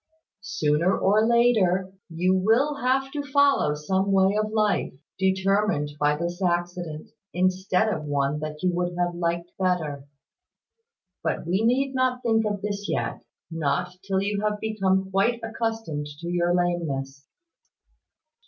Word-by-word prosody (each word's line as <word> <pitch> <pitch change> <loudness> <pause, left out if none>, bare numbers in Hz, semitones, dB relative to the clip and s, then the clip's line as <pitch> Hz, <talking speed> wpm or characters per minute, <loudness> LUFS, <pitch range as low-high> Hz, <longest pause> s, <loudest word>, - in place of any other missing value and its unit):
"Sooner 165 0 +1
or 210 +3 +3
later, 205 -6 +3 0.2
you 175 +3 +1
will 230 +10 +2
have 270 +1 0
to 290 - -3
follow 280 - +3
some 190 +6 0
way 195 +1 +3
of 215 0 0
life, 215 -2 +1 0.3
determined 190 -4 +1
by 150 0 +3
this 170 +4 -4
accident, 175 -3 -2 0.2
instead 185 +3 +1
of 180 -8 -2
one 145 0 0
that 155 +1 -6
you 180 -1 +2
would 175 0 -2
have 175 0 0
liked 170 0 -2
better. 155 -7 -1 1.2
But 160 0 -2
we 185 +6 0
need 265 +4 +2
not 255 -1 0
think 225 -2 +2
of 205 -2 -3
this 205 0 -3
yet: - - -2 0.3
not 165 +2 -1
till 195 0 0
you 205 0 -1
have 210 0 -1
become 190 -3 0
quite 215 +5 +2
accustomed 225 -10 -3
to 170 - -4
your 175 0 +1
lameness." 150 -6 -2
190 Hz, 140 wpm, -25 LUFS, 170-215 Hz, 1.2 s, or